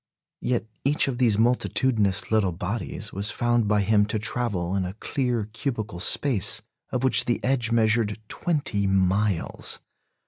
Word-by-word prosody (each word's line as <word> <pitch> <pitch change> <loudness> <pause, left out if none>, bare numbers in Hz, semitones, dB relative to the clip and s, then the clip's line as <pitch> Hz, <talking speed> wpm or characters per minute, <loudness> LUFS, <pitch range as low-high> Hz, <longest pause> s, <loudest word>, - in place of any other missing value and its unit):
Yet 120 -2 -1 0.2
each 140 +2 +3
of 130 -2 -3
these 115 -5 +3
multitudinous 110 -4 +1
little 105 -5 +2
bodies 105 +4 -4
was 100 +2 -1
found 120 -1 +1
by 105 0 +2
him 105 0 +3
to 110 - -1
travel 105 -5 -2
in 95 - 0
a 90 +2 -5
clear 120 -2 -2
cubical 110 -7 -4
space 105 +3 +2 0.3
of 125 - -2
which 130 - +4
the 120 - 0
edge 125 -3 +1
measured 110 -2 +2
twenty 130 - -1
miles! 95 0 +1
110 Hz, 145 wpm, -25 LUFS, 100-120 Hz, 0.3 s, which